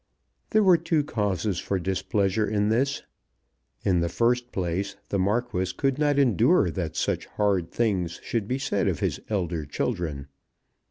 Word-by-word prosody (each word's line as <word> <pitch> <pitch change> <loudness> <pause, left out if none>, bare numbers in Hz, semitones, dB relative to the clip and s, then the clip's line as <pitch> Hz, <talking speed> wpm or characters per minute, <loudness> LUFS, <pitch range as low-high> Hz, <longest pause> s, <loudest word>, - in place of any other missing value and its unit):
There 215 -1 +4
were 180 -4 +6
two 155 -3 +1
causes 105 - -1
for 100 - -1
displeasure 95 +3 0
in 105 0 +1
this. 135 +5 +1 0.8
In 90 -3 +2
the 85 0 0
first 120 +3 +1
place 95 +2 -2
the 100 - 0
Marquis 95 -2 0
could 135 0 0
not 145 -2 +2
endure 125 -10 +4
that - - -4
such - - -1
hard 100 -5 0
things 95 -7 -1
should 110 -4 -2
be 130 - 0
said 100 -7 0
of - - 0
his - - -1
elder 85 -6 -1
children. 75 -1 -3
100 Hz, 155 wpm, -26 LUFS, 90-120 Hz, 0.8 s, were